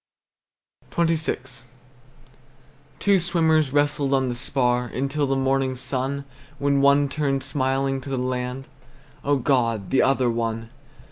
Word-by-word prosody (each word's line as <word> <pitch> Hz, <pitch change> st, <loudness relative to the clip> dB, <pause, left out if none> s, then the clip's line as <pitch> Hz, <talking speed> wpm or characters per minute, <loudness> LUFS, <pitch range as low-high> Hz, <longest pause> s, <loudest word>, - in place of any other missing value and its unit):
XXVI. 155 Hz, -6 st, -1 dB, 1.4 s
Two 200 Hz, -1 st, +3 dB
swimmers 160 Hz, -4 st, +2 dB
wrestled 145 Hz, -1 st, +1 dB
on 130 Hz, -1 st, +1 dB
the -, -, -2 dB
spar 125 Hz, 0 st, +1 dB
Until 140 Hz, +4 st, -1 dB
the 135 Hz, -, +1 dB
morning 135 Hz, 0 st, +1 dB
sun, 135 Hz, +2 st, -3 dB, 0.3 s
When 140 Hz, 0 st, +1 dB
one 140 Hz, +1 st, +4 dB
turned 140 Hz, -1 st, -1 dB
smiling 135 Hz, 0 st, -1 dB
to 135 Hz, -, -9 dB
the 135 Hz, -, -2 dB
land. 125 Hz, +1 st, -3 dB, 0.6 s
O 145 Hz, +1 st, +2 dB
God, 115 Hz, -6 st, 0 dB
the 135 Hz, -, +4 dB
other 130 Hz, -2 st, +2 dB
one! 115 Hz, 0 st, -3 dB
135 Hz, 125 wpm, -23 LUFS, 130-140 Hz, 1.4 s, one